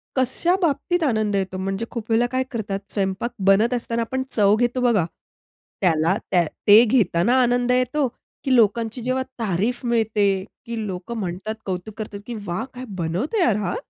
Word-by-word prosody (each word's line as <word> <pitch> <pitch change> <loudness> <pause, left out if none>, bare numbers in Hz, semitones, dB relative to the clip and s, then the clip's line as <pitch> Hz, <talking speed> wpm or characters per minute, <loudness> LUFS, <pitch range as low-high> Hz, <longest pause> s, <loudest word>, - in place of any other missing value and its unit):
कशा 260 +7 +2
बाबतीत 335 +2 +1
आनंद 215 -6 +1
येतो? 190 -1 -2
म्हणजे 195 +4 -2
खूप 230 -2 -6
वेळेला 225 +2 +4
काय 260 0 +1
करतात 205 -5 -3
स्वयंपाक 195 +4 -1 0.2
बनत 220 +5 +4
असताना 235 -1 -2
आपण 260 +3 -2
चव 205 -1 +4
घेतो 245 +2 0
बघा. 230 -8 +3 0.8
त्याला 165 0 +3 0.2
त्या 175 -2 +4 0.2
ते 210 +3 +9
घेताना 220 -1 +2
आनंद 245 0 +2
येतो 255 +3 +1 0.4
की 265 -2 +2
लोकांची 230 +1 +2
जेव्हा 255 +2 0 0.2
तारीफ 225 +4 -1
मिळते 220 -3 +1 0.4
की 230 -2 -4
लोकं 190 +5 -5
म्हणतात, 195 +2 -4
कौतुक 190 +3 -4
करतात 210 -2 -6
की 240 - -6
"वाह! 175 +4 -2
काय 255 0 -7
बनवतोय 185 - -1
यार 235 - +3
हा!" 190 -4 -2
225 Hz, 165 wpm, -22 LUFS, 195-245 Hz, 0.8 s, ते